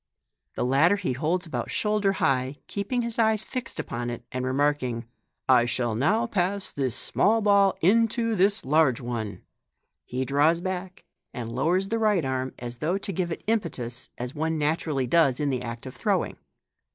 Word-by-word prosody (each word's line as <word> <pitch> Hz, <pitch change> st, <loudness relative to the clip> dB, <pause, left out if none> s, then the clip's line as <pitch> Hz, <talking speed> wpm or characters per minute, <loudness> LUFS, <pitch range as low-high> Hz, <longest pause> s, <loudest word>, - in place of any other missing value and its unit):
The -, -, -1 dB
latter 140 Hz, +9 st, +4 dB
he 185 Hz, -10 st, -2 dB
holds 165 Hz, +8 st, -1 dB
about 160 Hz, -, -4 dB
shoulder 210 Hz, -2 st, +1 dB
high, 135 Hz, -4 st, 0 dB
keeping 220 Hz, +5 st, -2 dB
his 235 Hz, 0 st, -3 dB
eyes 220 Hz, -1 st, +3 dB
fixed 255 Hz, -1 st, -5 dB
upon 120 Hz, +1 st, -3 dB
it, 120 Hz, -1 st, -6 dB
and 125 Hz, 0 st, -3 dB
remarking, 130 Hz, -3 st, 0 dB, 0.2 s
" -, -, -52 dB
I 125 Hz, -2 st, +5 dB
shall 120 Hz, -1 st, 0 dB
now 195 Hz, -, +2 dB
pass 200 Hz, -2 st, -1 dB
this 130 Hz, -4 st, -2 dB
small 225 Hz, +2 st, +2 dB
ball 200 Hz, -2 st, +4 dB
into 230 Hz, +4 st, +3 dB
this 200 Hz, +2 st, +2 dB
large 145 Hz, -3 st, +3 dB
one," 120 Hz, -4 st, -5 dB, 0.6 s
he 130 Hz, +1 st, -3 dB
draws 145 Hz, +5 st, +3 dB
back 185 Hz, -1 st, -5 dB, 0.3 s
and 115 Hz, -2 st, -5 dB
lowers 175 Hz, +10 st, +1 dB
the 225 Hz, 0 st, 0 dB
right 210 Hz, -8 st, +2 dB
arm, 130 Hz, 0 st, -2 dB
as 120 Hz, 0 st, -5 dB
though 170 Hz, +9 st, 0 dB
to 195 Hz, 0 st, -4 dB
give 175 Hz, 0 st, -1 dB
it -, -, -5 dB
impetus, 140 Hz, -, -2 dB
as 125 Hz, +2 st, -5 dB
one 160 Hz, +1 st, -1 dB
naturally 150 Hz, -2 st, 0 dB
does 135 Hz, -1 st, +3 dB
in 145 Hz, -2 st, 0 dB
the 125 Hz, -2 st, -1 dB
act 115 Hz, 0 st, -6 dB
of 130 Hz, -, -8 dB
throwing. -, -, 0 dB
155 Hz, 175 wpm, -26 LUFS, 130-200 Hz, 0.6 s, I